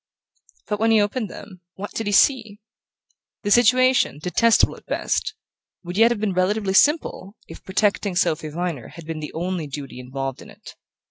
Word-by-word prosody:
But 210 -1 -3
when 225 +1 +2
he 225 -1 +5
opened 210 +1 -1
them, 185 -1 -12
what 205 +2 -7
did 225 - -4
he - - 0
see? 220 -1 +3 0.8
The 205 - -2
situation, 255 - +4
detestable 180 +9 +2
at - - -18
best, - - -2 0.5
would 175 +1 -7
yet 225 +3 +5
have 235 -3 -2
been 205 -2 -1
relatively 190 +2 0
simple 225 - +2
if - - -12
protecting 200 0 0
Sophy 155 -2 0
Viner 165 -5 -4
had 170 - -12
been 160 0 -5
the 150 - -6
only 175 -1 -3
duty 140 -2 -8
involved 135 +1 -5
in - - -13
it. - - -13
195 Hz, 175 wpm, -22 LUFS, 165-220 Hz, 0.8 s, he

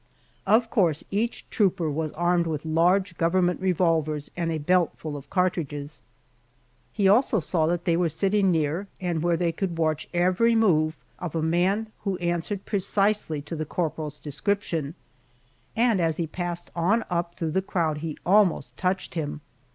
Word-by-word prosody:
Of 225 +3 +3
course 170 - +2
each 220 +4 -2
trooper 185 -5 +1
was 155 +1 -2
armed 175 0 +1
with 155 -1 -3
large 175 +3 +2
government 175 +1 +2
revolvers 165 -5 +1
and 170 -1 -1
a 160 - -1
belt 175 +3 +2
full 155 -2 -6
of 140 -1 -9
cartridges. 155 -6 -2 0.9
He 200 -3 +2
also 220 +3 +4
saw 160 -2 0
that 175 0 -1
they 170 - +3
were 170 -1 +2
sitting 195 +5 +2
near, 165 +3 0
and 175 -4 -1
where 170 0 +2
they 170 0 +1
could 170 0 -3
watch 155 -2 0
every 185 +7 +3
move 160 -8 +3 0.2
of 175 -3 -5
a 160 - 0
man 190 +7 +1
who 195 -3 -2
answered 175 +3 -2
precisely 200 -6 0
to 165 - -6
the 155 - -2
corporal's 155 -2 -3
description, 160 0 -2 0.8
and 230 -3 +3
as 165 -2 +1
he 170 - 0
passed 175 +1 -4
on 190 +7 +2
up 170 0 -1
through 160 -2 -2
the 190 +4 +1
crowd 165 -5 -1
he 155 -1 -5
almost 195 -1 +3
touched 185 +1 -1
him. 150 -3 -4
175 Hz, 165 wpm, -26 LUFS, 160-190 Hz, 0.9 s, also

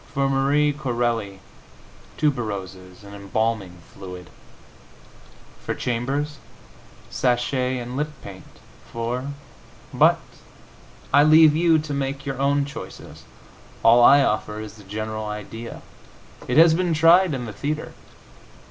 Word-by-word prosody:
For 140 0 +1
Marie 140 +2 +2
Corelli, 120 -8 -2 0.8
tuberoses 100 -10 -3
and 100 0 -12
embalming 100 -2 -2 0.2
fluid. 90 -2 -10 1.3
For - - -3
Chambers, 135 +5 -2 0.7
sachet 125 +1 0
and 125 0 -6
lip 150 +2 -2
paint. 95 -2 -10 0.5
For 120 +3 -3 0.7
But - - +4 0.9
I 145 - +7
leave 155 0 +6
you 165 0 +4
to 150 -1 -4
make 135 0 -3
your 135 -1 -4
own 140 +1 +1
choices. 140 - -10 0.6
All 120 +1 +6
I 140 +3 +7
offer 105 -2 -2
is 110 -1 -8
the 105 - -14
general 110 +2 -5
idea. 105 +2 -8 0.6
It 125 - 0
has 165 0 +7
been 175 -1 0
tried 165 +1 +5
in 125 -2 -5
the 110 - -7
theatre. 150 +8 -4
125 Hz, 120 wpm, -23 LUFS, 110-145 Hz, 1.3 s, I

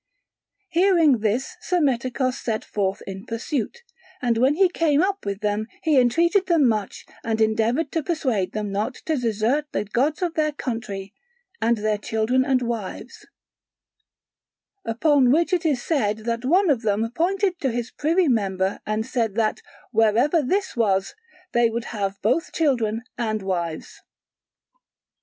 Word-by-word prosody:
Hearing 340 - +4
this 220 +4 -1
Psammetichos 260 -6 0
set 225 -4 -3
forth 200 0 -2
in 195 +1 -8
pursuit, 265 - -3 0.4
and 240 -2 +1
when 265 +4 +3
he 380 +3 +5
came 325 -3 +2
up 395 - -2
with 200 0 -3
them 210 +1 -1 0.2
he 305 -4 +4
entreated 340 - +3
them 330 -7 +4
much 215 -4 -2 0.2
and 225 -1 -1
endeavoured 225 +7 +1
to 325 - 0
persuade 260 - -1
them 210 -1 -3
not 210 +6 -2
to 320 - +1
desert 235 +5 0
the - - -1
gods 275 - 0
of 345 -2 -1
their 305 -2 0
country 215 -7 -5 0.5
and 230 +1 +2
their 210 0 0
children 225 +5 +1
and 260 -2 +1
wives: 230 -5 -5 1.6
upon 255 +2 +3
which 335 +5 +2
it 345 -2 +2
is 270 -5 0
said 215 -10 0
that 235 +1 -2
one 355 +4 +4
of 250 -5 +1
them 220 +1 0
pointed 370 +4 0
to 270 - 0
his 240 0 -3
privy 330 +4 +1
member 195 -5 0
and 215 +1 -1
said 230 -5 -1
that 220 -1 0 0.3
wherever 230 +8 +3
this 380 +8 -1
was, 195 -5 +1 0.4
there 235 -1 +3
would 235 +1 -3
they - - -9
have 200 -2 -3
both 325 - +1
children 235 -8 0 0.2
and 215 -3 -1
wives. 170 -4 -4
240 Hz, 150 wpm, -23 LUFS, 215-305 Hz, 1.6 s, he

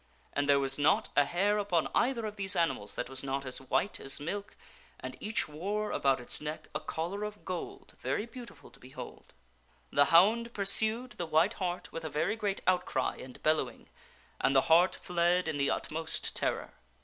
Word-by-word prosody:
And 145 0 0
there 140 0 +6
was 135 +1 -1
not 145 - +3
a 145 - +5
hair 200 +8 +1
upon 180 -6 +1
either 240 -2 +1
of 210 -1 -5
these 195 -2 +1
animals 165 -11 0
that 125 - -3
was 130 +1 -4
not 135 0 -2
as 130 0 -5
white 135 +9 0
as 135 +2 -1
milk, 200 +7 -5 0.4
and - - -6
each 215 +1 -1
wore 200 +8 -3
about 135 -1 +2
its 125 - -3
neck 150 +1 -6
a 150 - -1
collar 175 +6 -4
of 210 0 -7
gold 180 -2 -6
very 210 - -1
beautiful 235 +1 -12
to - - -19
behold. 130 +1 -11 0.6
The 145 - +5
hound 220 +9 +4
pursued 220 +5 +3
the 175 - -5
white 160 +7 +3
hart 180 -1 -3
with 165 - -6
a 160 - -3
very 160 +8 0
great 205 -3 -2
outcry 180 -7 +1
and 130 -1 -11
bellow 155 0 +2
ing, - - -18 0.5
and 135 - +2
the 135 - +7
hart 170 +5 +5
fled 175 0 +1
in 160 -2 -1
the 140 0 +2
utmost 160 +1 -2
terror. - - -1
170 Hz, 190 wpm, -31 LUFS, 145-205 Hz, 0.6 s, the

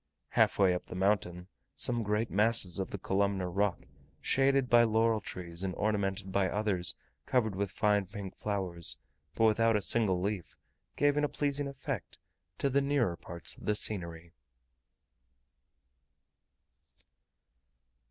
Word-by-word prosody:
Half - - +2
way 95 -2 +4
up 90 - -5
the - - -8
mountain, 90 -2 0 0.3
some 120 -1 +2
great 105 +1 -1
masses 105 -4 +4
of 95 - -3
the - - -5
columnar 95 -1 -1
rock, 100 0 0 0.4
shaded 135 -1 +2
by 120 -1 +6
laurel 115 0 +2
like - - -22
trees, 85 -1 -5
and 95 -2 -3
ornamented 100 -2 -1
by 95 -1 +1
others 95 -4 +1 0.3
covered 110 -6 +1
with 100 0 -2
fine 105 -1 +1
pink 100 0 -8
flowers 95 -5 +1 0.4
but - - +1
without 115 +1 +3
a - - +3
single 100 -3 +1
leaf, 100 -1 -4 0.4
gave 145 0 +2
a 150 0 +2
pleasing 145 -1 -1
effect 140 -1 -6 0.4
to - - 0
the 140 +1 +2
nearer 140 -10 +1
parts 85 +1 -8
of - - -13
the 105 - +1
scenery. 85 -6 -2
100 Hz, 140 wpm, -31 LUFS, 95-115 Hz, 0.4 s, by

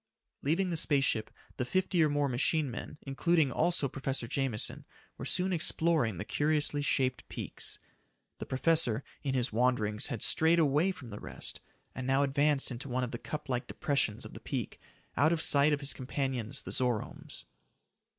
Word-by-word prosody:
Leaving 175 +6 +1
the 165 - 0
space 145 -4 +3
ship, 110 -3 0 0.3
the - - 0
fifty 180 +6 +1
or 155 - +3
more 145 0 +1
machine 140 +3 +1
men, 125 - -7
including 145 +1 +2
also 170 +1 +2
Professor 135 -2 -3
Jameson, 135 -4 -1 0.4
were - - -4
soon 185 +1 +1
exploring 160 - +2
the 105 - -4
curiously 150 +1 +1
shaped 130 -2 +1
peaks. - - -5 0.6
The - - -6
professor, 135 -4 +2 0.2
in 135 -2 -1
his 125 -3 0
wanderings 110 -3 +2
had 125 -7 -3
strayed 160 +1 +4
away 155 +3 +3
from 130 -11 -10
the 105 - -6
rest, - - -3 0.3
and 130 0 -5
now 135 +1 +3
advanced 140 0 +2
into 125 +3 -6
one 125 +1 0
of 125 - -3
the 120 - -5
cup 150 0 -5
like 125 -2 -2
depressions 140 -7 -1
of - - -9
the - - -8
peak, - - -4 0.4
out 150 +6 +4
of 170 - +1
sight 145 -1 +4
of 145 -1 +1
his 140 - 0
companions, 130 -3 -3
the - - -6
Zoromes. 125 -4 -3
140 Hz, 175 wpm, -31 LUFS, 125-155 Hz, 0.6 s, strayed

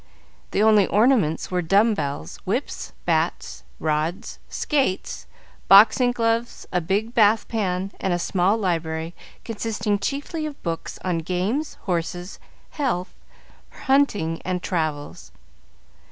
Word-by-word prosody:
The 205 - +1
only 215 -2 +5
ornaments 210 - +2
were 180 -1 +1
dumbbells, 170 - +1
whips, - - -3
bats, 60 0 -1 0.2
rods, 155 +4 -2
skates, 270 -11 -1 0.4
boxing 225 +5 +7
gloves, 230 0 -1
a 180 - +1
big 205 +7 -1
bath 220 -1 +4
pan 195 -3 -2
and 190 - -1
a 175 - +2
small 185 +4 +1
library, 165 -4 -2 0.3
consisting 215 -2 -2
chiefly 290 +6 -3
of 295 - -9
books 165 -2 -4
on 175 -2 0
games, 185 - -2
horses, 175 +1 -3 0.3
health, 240 - -2 0.6
hunting, 215 - +1
and 180 -1 -2
travels. 145 - -3
190 Hz, 110 wpm, -23 LUFS, 170-225 Hz, 0.6 s, boxing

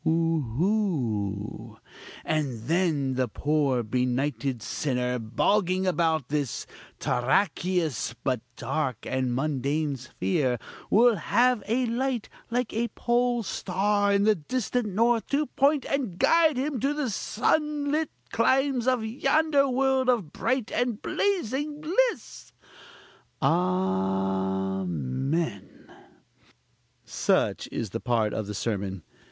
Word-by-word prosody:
(oohoo!) 150 - -1 0.5
and 140 -7 -1
then 155 -3 +1
the 130 0 0
poor 140 -1 0
benighted 125 +3 -1
sinner, 125 +1 -1
bogging 185 - +1
about 165 -6 +1
this 145 -4 -2 0.3
terraqueous, 160 - 0
but 130 -4 0
dark 130 -1 -2
and 130 -1 -1
mundane 145 +1 -1
sphere, 125 +1 -1 0.3
will 230 +1 +5
have 240 +6 +2
a 245 +4 +1
light 245 0 -1 0.2
like 245 0 -1
a 235 +2 0
pole 240 0 +1
star 200 +2 +1
of 200 0 +3
the 215 - +6
distant 240 - -2
north, 230 +3 +2
to 290 +2 +1
point 280 0 +2
and 250 -11 -2
guide 320 - +4
him 270 0 -1
to 280 +4 0
the 290 -6 -1
sunlit 300 +7 0 0.2
climes 260 +1 +2
of 250 -4 +2
yonder 275 +4 +2
world 265 0 +2
of 215 -12 +1
bright 250 -1 -1
and 245 -3 0
blazing 295 - -1
bliss!" 405 +11 -1 0.9
(A - - -1
a - - +5 1.3
amen!) 100 - -3 1.2
Such - - 0
is 110 -5 -3
part 115 -1 0
of 110 -2 -3
the 105 - -5
sermon. 100 -5 -3
185 Hz, 110 wpm, -27 LUFS, -, 1.3 s, the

